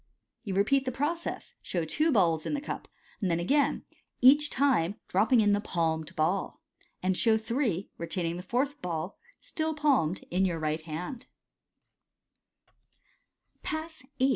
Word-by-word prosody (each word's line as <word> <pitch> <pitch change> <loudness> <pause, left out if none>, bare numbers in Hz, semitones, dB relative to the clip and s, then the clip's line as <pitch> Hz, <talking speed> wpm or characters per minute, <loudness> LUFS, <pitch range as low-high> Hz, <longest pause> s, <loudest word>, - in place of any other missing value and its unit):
You 195 -4 -3
repeat 265 +8 +3
the 255 - -1
process, 310 +7 -3
and - - -19
show 170 -3 -1
two 310 - +1
balls 170 - +2
ill - - -1
the - - -1
cap - - -6 0.3
j 195 - +1
then 170 -1 +1
again 280 +11 +1 0.3
(each 290 +4 +6
time 240 -10 +2
dropping 220 +5 +3
in 205 -1 +3
the 205 0 +2
palmed 165 -3 -1
ball), 175 +5 0 0.4
and 185 0 +2
«how 220 +3 +4
three, 220 - -1
retaining 170 0 -2
the - - -5
fourth 265 +9 -1
ball, 170 0 -4 0.2
still 315 -1 -2
palmed, 270 - +1
in 185 +2 +2
your 175 -3 +1
right 155 0 -2
kind 175 - -6 2.3
Pass 315 -2 -5 0.2
VIII. 260 +1 +3
205 Hz, 150 wpm, -29 LUFS, 170-275 Hz, 2.3 s, each